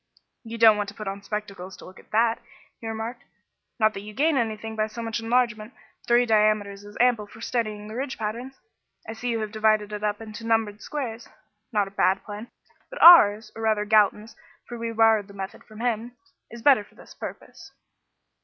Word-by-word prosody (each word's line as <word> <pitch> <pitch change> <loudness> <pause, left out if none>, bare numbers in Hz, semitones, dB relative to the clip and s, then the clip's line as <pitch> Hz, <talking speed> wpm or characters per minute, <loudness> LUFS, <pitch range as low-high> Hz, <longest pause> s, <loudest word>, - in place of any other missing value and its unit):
"You 230 0 -7
don't 225 -2 +7
want 205 -1 -2
to 200 - -12
put 215 - -7
on 195 +1 -5
spectacles 200 -2 -6
to - - -13
look 185 - -13
at - - -20
that," 225 +1 +2 0.4
he 225 - -8
remarked; 225 +2 -5 0.6
"not 215 -1 +3
that - - -6
you 210 +1 -11
gain 310 +4 +2
anything 220 -2 -2
by 215 0 0
so 230 +2 -7
much 225 0 -3
enlargement; 230 -1 0 0.3
three 240 +1 +4
diameters 210 -2 +1
is 205 0 -12
ample 240 -4 +2
for 220 - -15
studying 215 -3 -3
the 215 - -8
ridge 260 +3 -4
patterns. 235 +5 -5 0.5
I 225 - -5
see 245 +2 -4
you 230 -1 -1
have 215 -1 -4
divided 215 -1 +1
it 210 0 -5
up 210 0 -1
into 220 0 -9
numbered 225 -2 0
squares 240 -6 -5 0.4
not 205 -3 +1
a - - -11
bad 195 -1 +1
plan; 210 +3 -8 0.4
but - - -8
ours 220 -11 +8
or 225 - -7
rather 215 -2 +1
Galton's, 215 +1 +2 0.3
for 240 - -7
we 230 0 -4
borrowed 225 -2 +3
the 200 - -14
method 195 0 -7
from 215 0 -11
him 240 0 -2 0.4
is 235 0 -11
better 270 -7 +5
for - - -24
this - - -15
purpose." - - -10
220 Hz, 200 wpm, -25 LUFS, 210-230 Hz, 0.6 s, ours